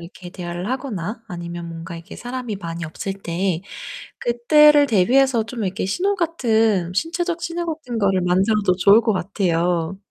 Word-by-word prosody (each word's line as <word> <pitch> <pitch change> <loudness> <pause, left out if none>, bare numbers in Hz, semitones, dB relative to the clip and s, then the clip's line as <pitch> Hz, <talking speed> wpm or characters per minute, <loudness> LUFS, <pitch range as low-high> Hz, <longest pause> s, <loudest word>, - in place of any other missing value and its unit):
이렇게 175 +1 -11
대화를 175 +3 -5
하거나 230 -5 -4
아니면 170 -1 -6
뭔가 165 0 -7
이렇게 165 0 -10
사람이 245 -3 -5
많이 170 -2 -6
없을 175 +5 -5
때 180 -2 -2 0.6
그때를 290 +5 +5
대비해서 240 +3 +3
좀 230 -1 -5
이렇게 190 +2 -2
신호 380 - 0
같은 225 - +1
신체적 340 - -1
신호 345 0 -3
같은 250 -7 -5
거를 195 -2 +2
만들어도 190 +2 +2
좋을 200 +4 +6
것 225 -1 +1
같아요. 180 -2 0
200 Hz, 350 characters per minute, -21 LUFS, 175-250 Hz, 0.6 s, 좋을